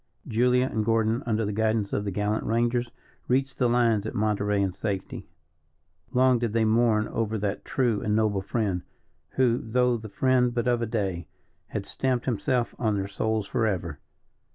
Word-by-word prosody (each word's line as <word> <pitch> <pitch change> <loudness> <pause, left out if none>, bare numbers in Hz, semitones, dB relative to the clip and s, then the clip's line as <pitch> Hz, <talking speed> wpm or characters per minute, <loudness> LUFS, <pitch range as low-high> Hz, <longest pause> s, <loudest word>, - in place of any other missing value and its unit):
Julia 125 +3 +3
and 110 -4 -1
Gordon, 115 +2 +1
under 110 -1 +1
the 105 - -2
guidance 110 -1 0
of 105 - -1
the - - -1
gallant 105 +3 -1
rangers, 120 +2 0 0.4
reached 135 +2 0
the 125 -2 +3
lines 115 -3 +2
at - - -6
Monterey 105 -1 +1
in 95 -1 +1
safety. 100 -1 -4 0.8
Long 130 -1 +4
did 115 -3 -2
they 115 -1 +2
mourn 110 -1 +3
over 110 -1 -1
that 100 -1 -3
true 120 -6 0
and 105 0 0
noble 105 -3 +1
friend, 100 -3 -1 0.5
who, 125 -2 +2
though 125 +1 +1
the 110 -1 -9
friend 125 +2 +2
but 120 0 0
of 120 -1 +2
a 115 - -1
day, 95 -6 -2 0.4
had - - -4
stamped 130 -2 -1
himself 120 +1 0
on 110 -3 +1
their 100 -1 -2
souls 110 +1 -1
forever. 90 -9 -1
110 Hz, 175 wpm, -26 LUFS, 105-120 Hz, 0.8 s, Long